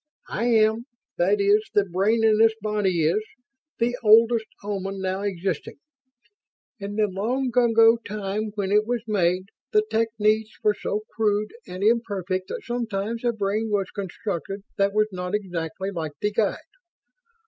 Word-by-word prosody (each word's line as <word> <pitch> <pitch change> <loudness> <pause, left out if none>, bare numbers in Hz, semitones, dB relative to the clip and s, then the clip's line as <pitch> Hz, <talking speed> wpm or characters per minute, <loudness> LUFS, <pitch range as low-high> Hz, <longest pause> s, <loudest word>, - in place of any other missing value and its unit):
"I 230 - -1
am 220 0 +3 0.3
that 195 +4 +2
is, 200 +1 +4
the 205 - +4
brain 200 +5 +1
in 220 -1 +4
this 225 0 +5
body 205 -5 0
is 165 +8 +2 0.6
the 240 +1 +1
oldest 225 0 +5 0.2
Oman 195 -1 -4
now 190 0 -2
existing. 185 -4 -3 1.0
In 200 0 -5
the 215 0 +3
long 235 +7 -1
ago 230 -1 +5
time 210 -1 -4
when 200 -2 -2
it 210 +1 +3
was 240 -2 -1
made, 185 -3 0 0.2
the 425 0 +4
techniques 220 -1 +1
were 210 - +4
so 210 0 -3
crude 210 -1 0
and 185 +1 -5
imperfect 200 -5 0
that - - -6
sometimes 230 -2 -3
a 240 - +2
brain 215 0 -1
was 200 -3 -1
constructed 195 -1 -5
that 200 0 +2
was 215 +1 +2
not 180 +1 -3
exactly 190 -1 -4
like 160 -5 -4
the 210 - 0
Guide. 210 -1 +1
210 Hz, 150 wpm, -24 LUFS, 195-225 Hz, 1.0 s, this